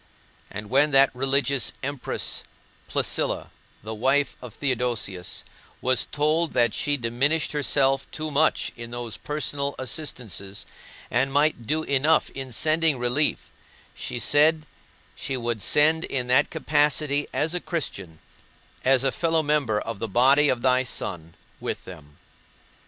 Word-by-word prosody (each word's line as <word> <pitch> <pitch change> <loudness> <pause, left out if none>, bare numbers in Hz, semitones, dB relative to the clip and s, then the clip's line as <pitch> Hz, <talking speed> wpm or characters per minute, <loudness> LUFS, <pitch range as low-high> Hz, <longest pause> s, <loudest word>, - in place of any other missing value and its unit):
And 105 +1 -8
when 140 +3 +4
that 135 0 +6
religious 135 0 +1
Empress 140 -1 -2 0.5
Placilla, - - 0 0.3
the 110 +1 -5
wife 135 +5 +1
of 125 -4 -10
Theodosius, 120 -9 -2 0.4
was 130 -1 +1
told 155 +3 +1
that 120 -3 +3
she 145 0 0
diminished 135 +6 0
herself 135 -2 +1
too 155 0 -5
much 155 +2 +2
in 115 0 -8
those 120 -3 -6
personal 145 -2 -3
assistances 115 - -5 0.5
and 135 +3 +1
might 145 -5 +1
do 155 +1 0
enough 145 +3 +2
in 135 -1 -7
sending 155 +3 +2
relief, 125 +5 -1 0.4
she - - -5
said 155 +6 +3 0.5
she 135 - -3
would 120 -3 -3
send 155 - +3
in 130 -2 -2
that 125 +4 +3
capacity 145 0 +1
as 160 +2 0
a 180 - 0
Christian, 100 - -4 0.7
as 130 0 +4
a 135 - +3
fellow 165 +1 +1
member 145 -8 +1
of 115 -2 -6
the 115 - -2
body 135 +7 +5
of 120 -2 0
thy 130 0 +4
Son, 85 -9 -4 0.2
with - - -4
them. 75 -5 -12
135 Hz, 135 wpm, -25 LUFS, 120-150 Hz, 0.7 s, that